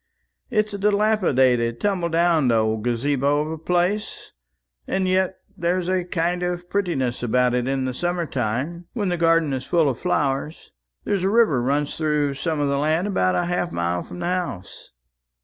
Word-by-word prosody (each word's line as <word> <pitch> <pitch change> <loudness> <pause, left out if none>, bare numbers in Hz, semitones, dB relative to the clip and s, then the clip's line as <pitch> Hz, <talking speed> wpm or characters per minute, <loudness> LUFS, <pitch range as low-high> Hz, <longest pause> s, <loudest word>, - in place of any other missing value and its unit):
It's 215 -4 0
a 200 - -4
dilapidated 155 - +2
tumbledown 170 -7 +2
old 110 -1 +1
gazabo 140 +4 +1
of 155 - -5
a 160 - -4
place, 180 +5 -1 0.6
and 190 -1 0
yet 185 0 +1 0.2
there's 175 0 -1
a 185 -1 0
kind 175 0 -1
of 175 0 -3
prettiness 165 -12 -1
about 125 +1 +2
it 125 0 0
in 130 -1 -1
summer 175 +4 -1
time, 140 +8 -3
when 205 -5 -1
the 175 - 0
garden 165 -3 +3
is 130 -1 -3
full 165 -1 +2
of 130 -4 -1
flowers. 150 -3 -2 0.3
There's 195 -3 -1
a 190 - +2
river 210 - +3
runs 140 +3 -1
through 150 -3 0
some 155 +3 -2
of 145 - +1
the 140 0 0
land 155 +5 +1
about 90 - +1
half 175 0 -1
a - - -12
mile 85 +1 -1
from 180 - -9
the - - -2
house." 175 - -4
165 Hz, 170 wpm, -23 LUFS, 130-180 Hz, 0.6 s, garden